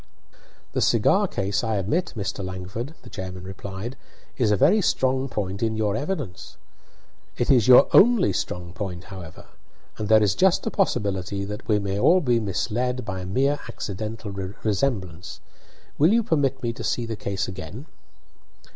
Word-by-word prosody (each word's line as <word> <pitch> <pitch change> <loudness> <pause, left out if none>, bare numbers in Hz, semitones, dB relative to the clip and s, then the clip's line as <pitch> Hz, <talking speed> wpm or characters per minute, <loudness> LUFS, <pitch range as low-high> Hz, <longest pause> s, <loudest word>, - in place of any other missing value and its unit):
"The - - 0
cigar - - +3
case, 100 +1 -1
I 110 -1 0
admit, 105 - -1
Mr. 100 -1 -3
Langford," 95 - -6
the - - -11
chairman 95 -1 -6
replied, 95 +5 -6 0.4
"is 120 -5 +1
a 105 - +4
very 215 - +4
strong 130 -5 +1
point 100 -3 -3
in 110 -1 0
your 105 -2 0
evidence. 140 - -4 0.8
It 120 - +2
is 120 -6 +4
your 130 +2 +8
only 235 -3 +6
strong 90 -1 -4
point, 90 -3 -5
however, 85 -4 -10 0.5
and 105 -1 -3
there 110 -1 +6
is 100 - +3
just 190 -1 +3
a 225 - -1
possibility 100 - -1
that 105 +1 -7
we 105 - +3
may 100 -1 -2
all 175 - +5
be 125 -8 +2
misled 120 +5 -2
by 100 -3 -4
a 90 - -6
mere 135 +8 +1
accidental 110 +2 -5 0.3
resemblance. 95 -6 -2 0.6
Will 155 +6 +5
you 230 +1 +3
permit 145 - 0
me 115 -1 -1
to - - -8
see 120 - -1
the 115 -1 -4
case 100 -1 -3
again?" 95 - -7
105 Hz, 165 wpm, -24 LUFS, 95-130 Hz, 0.8 s, your